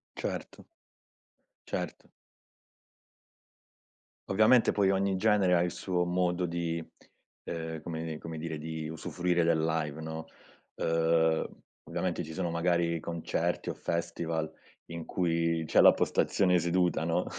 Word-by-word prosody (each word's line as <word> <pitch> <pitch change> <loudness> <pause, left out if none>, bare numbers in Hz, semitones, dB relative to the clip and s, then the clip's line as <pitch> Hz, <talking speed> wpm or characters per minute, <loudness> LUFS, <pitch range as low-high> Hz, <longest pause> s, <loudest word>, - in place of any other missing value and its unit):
Certo. - - -5 1.0
Certo. - - -4 2.2
Ovviamente 110 +5 +5
poi 100 -2 +3
ogni 95 0 +1
genere 100 -2 +3
ha 85 - +4
il 90 - -1
suo 90 0 -1
modo 90 0 0
di 85 -1 -2 0.6
ehm, 80 -1 -4
come 80 -1 -4
come 80 -1 -7
dire 80 0 -4
di 80 0 -5
usufruire 85 +2 0
del 80 -1 +2
live, 80 -1 -1
no. 80 0 -5 0.6
Uhm, 80 -1 +2 0.4
ovviamente 85 +1 -1
ci 80 - -8
sono 85 - -2
magari 85 0 +1
concerti 85 0 -2
o - - -1
festival 85 -1 -2 0.4
in 85 -1 -5
cui 85 -2 0
c'è - - +3
la - - +9
postazione 90 -2 +2
seduta, 85 -1 +1
no. 85 0 +1
85 Hz, 120 wpm, -30 LUFS, 80-90 Hz, 2.2 s, la